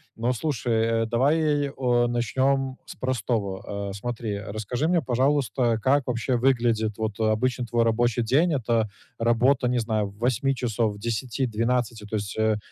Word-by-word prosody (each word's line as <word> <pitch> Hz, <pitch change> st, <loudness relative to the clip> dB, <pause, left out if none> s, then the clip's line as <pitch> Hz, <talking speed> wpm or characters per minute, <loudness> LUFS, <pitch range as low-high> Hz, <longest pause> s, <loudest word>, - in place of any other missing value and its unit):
Но 120 Hz, +3 st, 0 dB
слушай, 115 Hz, -4 st, 0 dB
давай, 145 Hz, +4 st, +2 dB
э, 125 Hz, -3 st, +1 dB
начнем 130 Hz, +3 st, 0 dB
с -, -, -10 dB
простого. 100 Hz, -5 st, -2 dB
Э, -, -, -7 dB
смотри, 110 Hz, 0 st, -4 dB
расскажи 110 Hz, +8 st, -3 dB
мне, 175 Hz, -2 st, +2 dB
пожалуйста, 125 Hz, -3 st, +1 dB
как 135 Hz, +1 st, +2 dB
вообще 125 Hz, +1 st, 0 dB
выглядит 115 Hz, -4 st, +1 dB
вот 110 Hz, -1 st, -3 dB
обычно 120 Hz, +3 st, +1 dB
твой 115 Hz, 0 st, +1 dB
рабочий 120 Hz, +1 st, +1 dB
день. 155 Hz, +8 st, +3 dB
Это 115 Hz, -4 st, 0 dB, 0.3 s
работа, 125 Hz, +3 st, +2 dB
не 125 Hz, 0 st, +1 dB
знаю, 110 Hz, -3 st, -1 dB
8 125 Hz, +5 st, 0 dB
часов, 115 Hz, -3 st, -1 dB
10, 115 Hz, +4 st, -2 dB
12? 115 Hz, -1 st, -1 dB
То 110 Hz, -, -4 dB
есть, 100 Hz, +1 st, -5 dB
э, 110 Hz, -1 st, +2 dB
120 Hz, 145 wpm, -25 LUFS, 110-130 Hz, 0.3 s, день